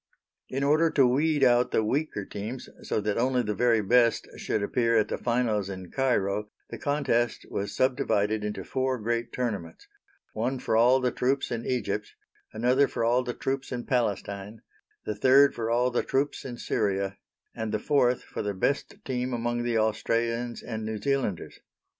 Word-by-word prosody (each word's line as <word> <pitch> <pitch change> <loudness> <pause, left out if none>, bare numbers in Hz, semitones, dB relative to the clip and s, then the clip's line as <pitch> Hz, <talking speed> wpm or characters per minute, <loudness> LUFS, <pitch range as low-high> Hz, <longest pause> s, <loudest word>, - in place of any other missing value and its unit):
In 135 +1 -2
order 155 +4 +4
to 140 -4 +4
weed 145 +3 +2
out 125 -1 +4
the 110 - +1
weaker 130 -3 -1
teams 110 +7 -6
so - - -1
that 105 +1 -1
only 125 0 +2
the 105 -1 -1
very 115 +1 +2
best 120 +3 +3
should 105 - -1
appear 115 +2 +2
at 110 - +2
the - - -2
finals 115 -5 0
in 95 -2 -7
Cairo, 105 -6 0 0.2
the 115 - -6
contest 130 -5 0
was 100 0 -3
subdivided 110 -5 +1
into 105 0 -4
four 130 0 -1
great 115 +1 -2
tournaments: 105 -10 -4 0.5
one 120 +5 -1
for 110 - -1
all 125 +4 +5
the 125 -1 +1
troops 135 +2 0
in 115 -1 -3
Egypt, 105 -5 -2 0.4
another 125 +5 +3
for - - -3
all 120 +2 +3
the 125 -1 -4
troops 135 0 -3
in 120 -1 -4
Palestine, 105 -3 -2 0.4
the 105 - -1
third 130 +6 +5
for 115 -1 -3
all 125 +2 +2
the 120 - +1
troops 140 +2 -1
in 125 -2 -6
Syria, 100 -3 -1 0.3
and 110 -1 -4
the - - +1
fourth 125 +1 +2
for - - -6
the 105 -1 -3
best 140 +9 -1
team 125 -1 -2
among 120 0 -1
the 120 -1 0
Australians 115 +2 0
and 110 -2 -5
New 110 0 -3
Zealanders. 135 -7 -2
120 Hz, 175 wpm, -27 LUFS, 105-130 Hz, 0.5 s, all